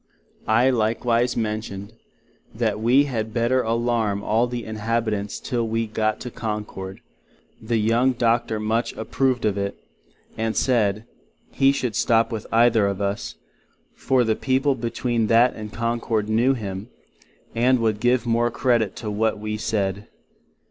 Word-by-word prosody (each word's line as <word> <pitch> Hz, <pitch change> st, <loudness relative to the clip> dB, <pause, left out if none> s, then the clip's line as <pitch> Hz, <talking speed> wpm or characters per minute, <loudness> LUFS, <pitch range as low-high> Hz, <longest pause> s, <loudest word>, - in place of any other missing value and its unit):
I 120 Hz, +4 st, +4 dB
likewise 120 Hz, +1 st, +1 dB
mentioned, 105 Hz, -2 st, -4 dB, 0.6 s
that -, -, 0 dB
we 125 Hz, +6 st, +4 dB
had 110 Hz, -5 st, -3 dB
better 120 Hz, +2 st, +2 dB
allarm 115 Hz, -3 st, 0 dB
all 115 Hz, +4 st, +2 dB
the 120 Hz, -1 st, -4 dB
Inhabitents 110 Hz, -1 st, -2 dB
till 120 Hz, -3 st, -2 dB
we 115 Hz, +1 st, -1 dB
got 110 Hz, 0 st, -1 dB
to 125 Hz, -, -6 dB
Concord; 105 Hz, -5 st, -5 dB, 0.6 s
the 115 Hz, +1 st, -1 dB
young 115 Hz, +4 st, +2 dB
Doctor 115 Hz, -2 st, +1 dB
much 110 Hz, +2 st, -1 dB
approved 125 Hz, +2 st, -1 dB
of 100 Hz, -1 st, 0 dB
it, 100 Hz, 0 st, -3 dB, 0.6 s
and 110 Hz, 0 st, -2 dB
said, 110 Hz, -4 st, +1 dB, 0.5 s
he 135 Hz, 0 st, +4 dB
would 120 Hz, -3 st, -1 dB
stop 115 Hz, +1 st, +2 dB
with 110 Hz, -2 st, -5 dB
either 115 Hz, -2 st, +4 dB
of 100 Hz, -1 st, -2 dB
us, 100 Hz, 0 st, -3 dB, 0.6 s
for 130 Hz, -2 st, +1 dB
the 110 Hz, -1 st, +1 dB
people 135 Hz, +2 st, +1 dB
between 120 Hz, -1 st, -1 dB
that 115 Hz, +3 st, +4 dB
and 105 Hz, -1 st, -7 dB
Concord 115 Hz, -1 st, -1 dB
knew 120 Hz, +5 st, +2 dB
him, 100 Hz, -1 st, -6 dB, 0.6 s
and 125 Hz, +3 st, +3 dB
would 110 Hz, -3 st, 0 dB
give 125 Hz, +1 st, +2 dB
the 120 Hz, -, -4 dB
more 120 Hz, +1 st, +2 dB
credit 120 Hz, -4 st, +1 dB
to 105 Hz, -, -5 dB
what 110 Hz, +1 st, 0 dB
we 105 Hz, 0 st, -4 dB
said. 100 Hz, -2 st, -2 dB
115 Hz, 150 wpm, -23 LUFS, 105-120 Hz, 0.6 s, I